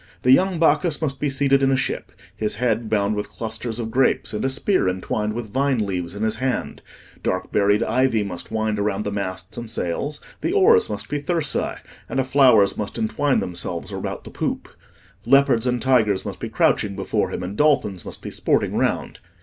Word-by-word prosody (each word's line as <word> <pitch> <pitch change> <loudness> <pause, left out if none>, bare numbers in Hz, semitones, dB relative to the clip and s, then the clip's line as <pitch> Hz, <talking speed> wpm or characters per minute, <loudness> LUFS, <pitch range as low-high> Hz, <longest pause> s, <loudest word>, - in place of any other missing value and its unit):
The 125 - +5
young 185 +5 +4
Bacchus 160 0 +2
must 140 -4 -2
be 145 - 0
seated 135 0 +2
in 135 - +3
a 135 - +3
ship, 130 - -3 0.2
his 105 -1 -2
head 115 -1 0
bound 105 -1 +1
with 105 - -3
clusters 115 0 -5
of 115 -2 -4
grapes, 130 -1 +1
and 105 - -2
a 135 - +1
spear 135 - +1
entwined 105 +3 -2
with 110 -3 -6
vine 135 0 +2
leaves 95 -4 -2
in 105 - -3
his 110 0 0
hand: 130 +1 -2 0.4
dark 95 0 -2
berried 105 +1 +3
ivy 130 -4 +2
must 90 -3 -6
wind 110 -1 -1
about 100 0 -1
the 100 - -3
masts 95 +1 -5
and 120 -1 -7
sails, 140 - -3 0.2
the 355 - -1
oars 440 +2 +5
must - - -4
be 145 -1 -3
thyrsi, 160 -2 -1 0.3
and 135 -1 0
flowers 130 -7 +5
must 105 - -4
wreathe 145 - +1
themselves 85 -1 -4
about - - -5
the - - -10
poop; - - -3 0.5
leopards 135 -2 +4
and 125 -1 0
tigers 110 -7 +2
must - - -6
be - - -4
crouching 100 -2 +1
before - - -1
him, - - -4
and 95 +3 -5
dolphins 110 - +2
must - - -8
be - - -6
sporting - - 0
round. - - -1
115 Hz, 195 wpm, -22 LUFS, 105-140 Hz, 0.5 s, The